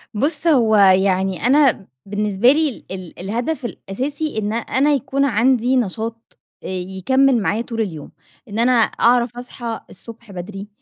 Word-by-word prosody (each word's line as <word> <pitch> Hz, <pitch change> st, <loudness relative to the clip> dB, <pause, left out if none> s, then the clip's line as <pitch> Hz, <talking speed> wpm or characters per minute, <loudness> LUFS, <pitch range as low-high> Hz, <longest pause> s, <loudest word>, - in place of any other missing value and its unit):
بُص، 290 Hz, +7 st, -1 dB
هو 235 Hz, -9 st, +4 dB
يعني 190 Hz, -1 st, +3 dB
أنا 265 Hz, -7 st, +3 dB, 0.2 s
بالنسبة 205 Hz, +3 st, +2 dB
لي 300 Hz, -3 st, -1 dB
ال 185 Hz, -3 st, -8 dB
الهدف 240 Hz, -, -3 dB
الأساسي 280 Hz, +8 st, -4 dB
إن 215 Hz, 0 st, -1 dB
أنا 265 Hz, +5 st, +1 dB
يكون 275 Hz, +1 st, 0 dB
عندي 250 Hz, +1 st, +2 dB
نشاط، 230 Hz, 0 st, -3 dB, 0.3 s
آآ -, -, -6 dB
يكمِّل 190 Hz, +8 st, +1 dB
معايا 210 Hz, +3 st, 0 dB
طول 230 Hz, -1 st, -4 dB
اليوم. 160 Hz, -8 st, -5 dB, 0.4 s
إن 215 Hz, +1 st, -5 dB
أنا 245 Hz, +2 st, +3 dB
أعرف 240 Hz, +1 st, +2 dB
أصحى 240 Hz, -2 st, -6 dB
الصبح 230 Hz, +1 st, -12 dB
بدري، 195 Hz, +2 st, -7 dB
230 Hz, 140 wpm, -20 LUFS, 195-260 Hz, 0.4 s, هو